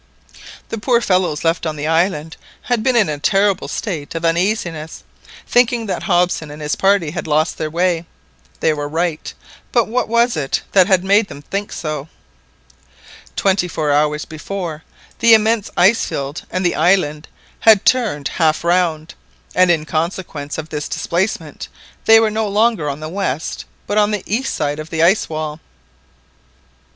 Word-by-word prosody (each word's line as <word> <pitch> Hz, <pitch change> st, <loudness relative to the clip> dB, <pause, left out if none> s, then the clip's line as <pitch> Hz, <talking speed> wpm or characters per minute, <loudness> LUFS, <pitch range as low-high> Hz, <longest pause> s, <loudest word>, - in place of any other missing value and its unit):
The 225 Hz, -, -4 dB
poor 235 Hz, +2 st, +2 dB
fellows 185 Hz, -8 st, 0 dB
left 165 Hz, 0 st, +1 dB
on 155 Hz, -, -3 dB
the 145 Hz, 0 st, -4 dB
island 160 Hz, -1 st, 0 dB, 0.3 s
had 245 Hz, -3 st, 0 dB
been 255 Hz, +2 st, +1 dB
in 215 Hz, -4 st, +4 dB
a 150 Hz, -1 st, -3 dB
terrible 195 Hz, +4 st, +1 dB
state 165 Hz, -8 st, -4 dB
of 165 Hz, +1 st, -2 dB
uneasiness, 165 Hz, -2 st, -1 dB, 0.4 s
thinking 240 Hz, -1 st, +2 dB
that 200 Hz, -, -3 dB
Hobson 175 Hz, -4 st, +1 dB
and 150 Hz, +1 st, -9 dB
his 150 Hz, -1 st, -2 dB
party 195 Hz, -5 st, +2 dB
had 175 Hz, 0 st, -5 dB
lost 155 Hz, +1 st, +1 dB
their 155 Hz, -, -2 dB
way. 170 Hz, 0 st, 0 dB, 0.5 s
They 160 Hz, -, +3 dB
were 145 Hz, -1 st, -4 dB
right, 165 Hz, 0 st, -2 dB, 0.4 s
but 235 Hz, -3 st, +2 dB
what 245 Hz, +3 st, -1 dB
was 235 Hz, +2 st, +2 dB
it 140 Hz, -3 st, -2 dB
that 190 Hz, -2 st, +5 dB
had 190 Hz, -3 st, +3 dB
made 200 Hz, +2 st, +3 dB
them 145 Hz, -3 st, -11 dB
think 200 Hz, +6 st, -4 dB
so? 155 Hz, -1 st, -5 dB, 1.3 s
Twenty 190 Hz, -2 st, +1 dB
four 155 Hz, -3 st, -1 dB
hours 150 Hz, +1 st, +1 dB
before, 160 Hz, 0 st, -6 dB, 0.4 s
the 230 Hz, -1 st, +7 dB
immense 220 Hz, -1 st, +1 dB
ice 195 Hz, +6 st, +4 dB
field 140 Hz, +3 st, -4 dB
and 185 Hz, +1 st, -2 dB
the 175 Hz, -, +2 dB
island 160 Hz, -3 st, +1 dB, 0.3 s
had 220 Hz, -3 st, +5 dB
turned 215 Hz, -, +1 dB
half 160 Hz, -1 st, +1 dB
round, 170 Hz, -3 st, 0 dB, 0.4 s
and 185 Hz, 0 st, +4 dB
in 160 Hz, -3 st, +2 dB
consequence 155 Hz, -2 st, -3 dB
of 160 Hz, 0 st, -6 dB
this 150 Hz, -1 st, -4 dB
displacement 170 Hz, -3 st, -2 dB, 0.4 s
they 225 Hz, 0 st, +8 dB
were 220 Hz, -1 st, +2 dB
no 220 Hz, 0 st, -1 dB
longer 210 Hz, -6 st, +1 dB
on 140 Hz, +2 st, -5 dB
the 155 Hz, -, -5 dB
west, 160 Hz, -5 st, -3 dB, 0.2 s
but 205 Hz, +1 st, +1 dB
on 210 Hz, 0 st, +3 dB
the 210 Hz, -3 st, -2 dB
east 245 Hz, +7 st, -2 dB
of 150 Hz, +1 st, -2 dB
the 160 Hz, -1 st, 0 dB
ice 190 Hz, +5 st, +3 dB
wall! 155 Hz, -1 st, -4 dB
175 Hz, 165 wpm, -18 LUFS, 155-205 Hz, 1.3 s, they